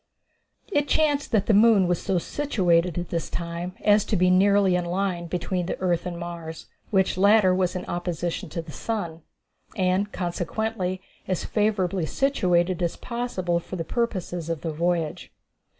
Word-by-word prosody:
It 290 -5 +1
chanced 290 -2 +1
that 210 -3 +2
the 220 - +3
moon 210 -3 +6
was 175 -1 0
so 190 -2 0
situated 180 - +1
at 175 0 -3
this 165 -1 -2
time 170 +2 -4
as 210 -1 +5
to - - -1
be 180 -1 +4
nearly 195 0 +4
in 180 -1 0
a - - -5
line 180 -2 -1
between 180 +1 -2
the - - -3
earth 180 -1 0
and 175 -1 -5
Mars, 170 -2 -7 0.2
which 190 -2 +1
latter 200 -1 +5
was 185 0 0
in 180 - -4
opposition 175 +1 -3
to 165 +2 -4
the 165 - -10
sun, 170 -5 -4 0.5
and 190 +2 +1
consequently 185 +2 -2 0.2
as 185 -2 -1
favorably 195 -5 0
situated 185 - +1
as 170 -1 0
possible 215 -8 -2
for 180 - -8
the 165 -2 -3
purposes 180 -6 -2
of 165 -2 -2
the 165 - -3
voyage. 165 0 -1
180 Hz, 165 wpm, -25 LUFS, 170-205 Hz, 0.5 s, moon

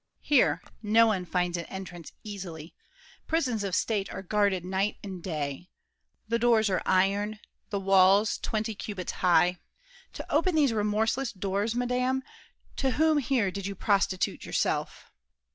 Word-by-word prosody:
Here, 290 -4 +3 0.2
no 225 +1 +5
one 195 -5 0
finds 180 -1 -1
an 170 - -5
entrance 180 -4 -8
easily. 180 -6 -8 0.5
Prisons 255 -10 0
of 195 -3 -1
state 205 -3 -1
are - - -6
guarded 200 -2 +1
night 190 +3 -1
and 190 -3 -7
day, 155 0 -4 0.6
The 230 +1 0
doors 225 -3 +3
are 185 - +1
iron, 200 +3 +2 0.3
walls 195 +1 +4
twenty 220 0 -2
cubits 200 -3 -5
high; 180 0 +3 0.5
To - - -7
open 335 +3 +2
these 285 -6 +3
remorseless 220 +4 0
doors, 200 +4 -2
madame, 250 +2 0 0.5
To 270 - +1
whom 315 -1 +3
here 245 -7 +1
did 200 0 -5
you 200 - -5
prostitute 195 -2 0
yourself? - - -2
205 Hz, 140 wpm, -28 LUFS, 185-230 Hz, 0.6 s, no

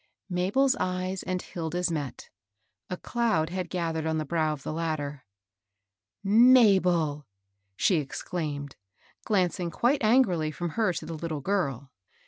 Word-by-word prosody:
Mabel's 200 +10 +2
eyes 185 +1 -2
and 185 0 -2
Hilda's 175 +1 -2
met. 145 -5 -5 0.6
A 180 - -3
cloud 180 -11 0
had 180 -2 -3
gathered 165 -3 -2
on 160 0 0
the 155 - -2
brow 155 +1 0
of 145 -3 -6
the - - -4
latter. 150 -4 -3 0.6
" 95 - -62 0.3
Mabel! 175 - +3 0.2
" 95 0 -50
she 180 - +3
exclaimed, 145 -1 -4 0.5
glancing 180 -3 +1
quite 250 - +1
an 240 +5 +6
grily 160 -6 -1
fi'om 165 +3 -4
her 215 +1 +1
to - - -5
the 165 - -6
little 160 -2 -4
girl. 140 - -1
165 Hz, 145 wpm, -27 LUFS, 150-185 Hz, 0.6 s, an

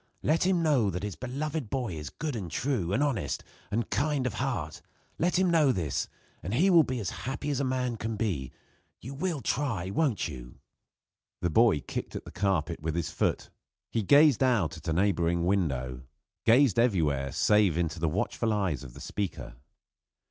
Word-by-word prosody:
Let 165 +4 +2
him 180 -3 +2
know 135 -10 +3
that 90 +1 -4
his 105 -3 -4
beloved 140 +1 -4
boy 125 -7 -2
is 75 -2 -6
good 150 -3 -4
and 95 -6 -4
true, 120 - -1
and 135 +9 +2
honest, 135 -10 -1 0.3
and 115 +1 -1
kind 145 -2 +1
of 125 - -1
heart 110 - -3 0.4
let 175 +2 +2
him 185 -1 +3
know 155 -5 +4
this, 80 - -1 0.3
and 95 +8 -3
he 185 +9 +4
will 170 -2 +8
be 130 -4 -2
as 100 - -3
happy 135 +3 -4
as 140 - -1
a - - +1
man 125 -2 -1
can 110 +1 -3
be. 95 - -2 0.5
You 130 +5 -8
will 160 0 -2
try, 110 -7 -1
won't 135 -2 +1
you?" 60 -5 -9 0.8
The 85 - 0
boy 110 -6 +4
kicked - - -5
at - - -6
the - - -9
carpet 85 -5 0
with 80 +1 -2
his 85 -2 -2
foot; - - -1 0.4
he 115 - 0
gazed 145 +4 +5
out 115 -12 +2
at 80 - -11
a 80 - +1
neighboring 85 -2 +1
window; 65 -10 0 0.5
gazed 120 -2 +5
everywhere 75 - +2
save 105 -3 +3
into 85 -1 -1
the 80 0 +1
watchful 105 +6 -1
eyes 95 -9 -1
of 65 -3 -11
the - - -10
speaker. 100 -3 -4
105 Hz, 185 wpm, -29 LUFS, 85-135 Hz, 0.8 s, will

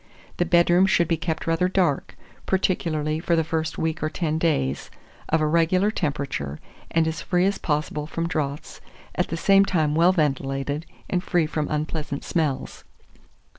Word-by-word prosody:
The 175 - +2
bedroom 175 +2 +4
should 170 -3 +3
be 165 - +2
kept 160 0 -3
rather 165 +2 +2
dark, 180 -7 0 0.3
particularly 155 -5 0
for 170 +1 +1
the 165 - +2
first 160 0 -2
week 160 0 -2
or 155 - 0
ten 160 -1 -2
days; 70 - 0 0.4
of 160 0 +2
a - - +2
regular 170 +6 +2
temperature, 140 - -3 0.3
and 165 -1 +2
as 160 - -3
free 180 -1 +1
as 200 +1 0
possible 150 -1 -2
from 165 +1 -2
draughts, 145 -3 -4 0.3
at - - 0
the 165 - -3
same 195 +3 +5
time 160 -6 +1
well 170 +3 +5
ventilated 145 -2 -1 0.2
and 180 -1 -1
free 175 -4 +1
from 150 -1 -2
unpleasant 150 -1 -3
smells. 155 -6 -2
160 Hz, 165 wpm, -24 LUFS, 150-175 Hz, 0.4 s, same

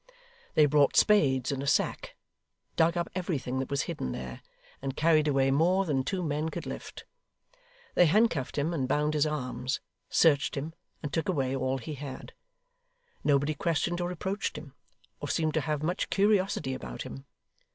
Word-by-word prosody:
They 155 - +7
brought 145 -1 +3
spades 140 - +4
and 135 -1 -2
a 140 - -4
sack; - - 0 0.6
dug 165 +2 +3
up 170 - 0
everything 155 -8 -2
that 130 - -3
was 140 0 0
hidden 105 - -4
there; 60 -1 -7 0.4
and 135 0 -3
carried 155 -1 +4
away 135 -2 +3
more 180 +7 +3
than 140 -5 0
two 185 +6 -2
men 155 0 -1
could - - -6
lift. - - -7 0.9
They 175 - +5
handcuffed 165 - +2
him 150 +4 0
and 135 -6 -1
bound 150 +3 +1
his 150 0 +2
arms, 130 -3 -2 0.3
searched 145 -3 +3
him, 150 +4 -4 0.3
and 145 - -4
took 165 0 -1
away 135 -6 0
all 130 0 0
he 135 +5 -6
had. 140 -2 -8 0.9
Nobody 145 +1 +2
questioned 170 +3 -1
or 175 - -1
reproached 190 +4 -3
him, - - -10 0.5
or - - -5
seemed 160 -2 +1
to 155 - +1
have 150 -1 -2
much 175 +4 -1
curiosity 195 -9 +2
about 60 - -6
him. 65 -1 -9
150 Hz, 170 wpm, -29 LUFS, 135-170 Hz, 0.9 s, They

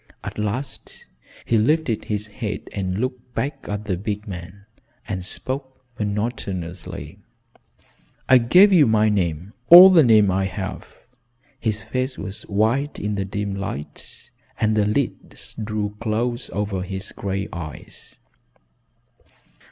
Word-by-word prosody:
At - - -6
last 105 +7 -5 0.4
he 115 - +2
lifted 130 -1 +1
his 105 0 -2
head 105 0 -5
and 95 -2 -2
looked 125 +1 -4
back 140 0 -3
at 105 +1 -3
the 95 -4 -1
big 105 +2 -4
man 95 +1 -8 0.4
and 95 -2 -3
spoke 130 +6 -5
monotonously. 100 -5 -4 1.1
"I 130 -1 +7
gave 185 - +6
you 160 -7 +6
my 110 -1 +3
name 90 -1 -1 0.2
all 180 +3 +12
the 175 -3 +7
name 110 -7 +5
I 95 +1 +1
have." 95 0 -5 0.7
His 110 -2 -2
face 130 +1 -3
was 95 0 -6
white 115 +8 +1
in 105 +1 -2
the 100 -1 -2
dim 100 +1 -3
light 95 -7 -7 0.3
and 110 0 +2
the 105 -1 +2
lids 125 +5 -3
drew 105 -2 -3
close 120 +2 -2
over 100 -1 -2
his 95 +1 -6
gray 100 0 -3
eyes. 80 -4 -9
105 Hz, 130 wpm, -22 LUFS, 100-120 Hz, 1.1 s, all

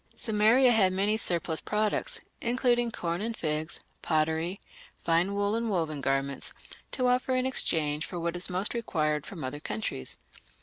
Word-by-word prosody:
Sumeria 225 +4 +4
had 195 -5 +4
many 200 +3 +2
surplus 170 -6 0
products, 210 0 0 0.2
including 240 0 +2
corn 170 -4 -3
and 225 +1 -3
figs, 155 0 -1 0.2
pottery, 160 +3 0 0.4
fine 170 +4 +1
wool 205 +1 +1
and 230 0 -1
woven 160 -7 -1
garments, 135 0 -1 0.4
to 255 - 0
offer 250 +1 +2
in 255 0 +1
exchange 155 - 0
for 175 - -5
what 170 +1 -2
it 175 +2 -1
most 185 +3 -1
required 155 - -1
from 175 -6 -7
other 130 +3 -4
countries. 105 - -4
185 Hz, 155 wpm, -29 LUFS, 155-225 Hz, 0.4 s, Sumeria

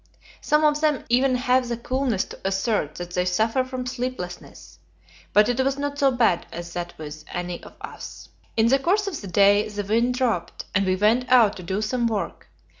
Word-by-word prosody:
Some 300 +1 +2
of 300 0 +3
them 300 -4 +1
even 255 +2 +3
have 250 0 +2
the 235 - -2
coolness 255 -4 -1
to - - -11
assert 195 -5 -1
that 175 0 -7
they 180 0 0
suffer 220 +8 +1
from 255 -1 -5
sleeplessness, 250 -8 -6 0.5
but 210 +1 +5
it 245 +1 -1
was 270 +1 0
not 285 0 -3
so 275 - +5
bad 230 -9 +1
as 170 0 -7
that 175 -1 -5
with 155 0 -8
any 175 0 -4
of - - -13
us. - - -9 0.3
In 225 +1 +4
the 270 +2 +4
course 390 +8 +1
of 380 -7 -4
the 200 - -7
day 200 +3 +4
the 205 -1 -4
wind 230 +5 +1
dropped, 225 -10 -1
and 195 0 +2
we 185 - +2
went 225 +6 +2
out 235 -5 +5
to - - -8
do 190 +4 -2
some 240 +2 0
work. 205 -7 -4
230 Hz, 200 wpm, -24 LUFS, 185-255 Hz, 0.5 s, but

